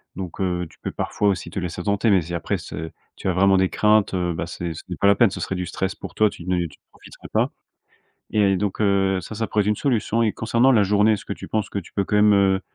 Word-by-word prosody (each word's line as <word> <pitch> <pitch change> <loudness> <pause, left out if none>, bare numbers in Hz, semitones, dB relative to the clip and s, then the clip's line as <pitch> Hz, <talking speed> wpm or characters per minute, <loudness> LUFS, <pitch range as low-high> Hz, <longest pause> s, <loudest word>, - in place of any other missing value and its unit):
Donc, 95 0 -7
heu, 90 -2 -1
tu - - -22
peux - - -5
parfois 105 - -1
aussi 95 -3 0
te 90 - -4
laisser 90 -1 -4
tenter. 100 +3 +1
Mais 95 -3 +4
si 85 +2 -7
après 85 - -1
ce 80 +1 -7 0.3
tu - - -5
as 95 - +2
vraiment 95 +2 +4
des 95 0 +2
craintes, 105 -1 +3
heu, 90 -2 0
bah, 80 - -3
c'est 85 -1 -5
ce 80 - -9
n'est 90 - -3
pas 100 - +2
la 100 - +6
peine. 115 0 +5
Ce - - -6
serait 95 - -2
du 90 0 -3
stress 95 +2 -3
pour - - -9
toi, 110 -1 +4
tu 85 - -11
ne 90 0 0
tu 75 -4 -11
ne - - -63
profiterais - - -14
pas - - +2 0.8
et 100 -2 +3
donc, 100 0 -2
heu, 95 -2 +2
ça, 95 +5 -8
ça 110 +1 -1
pourrait 105 -1 +1
être - - -4
une 105 - +2
solution 115 -2 0
et 110 - +2
concernant 115 +5 +2
la 110 -5 +4
journée, 105 +2 +3
est-ce 105 - -2
que - - -3
tu - - -10
penses 110 -2 -1
que 100 - -3
tu 90 - -14
peux 100 - -1
quand 105 - -1
même, 105 0 +5
heu, 95 -1 +3
100 Hz, 285 wpm, -23 LUFS, 90-105 Hz, 0.8 s, la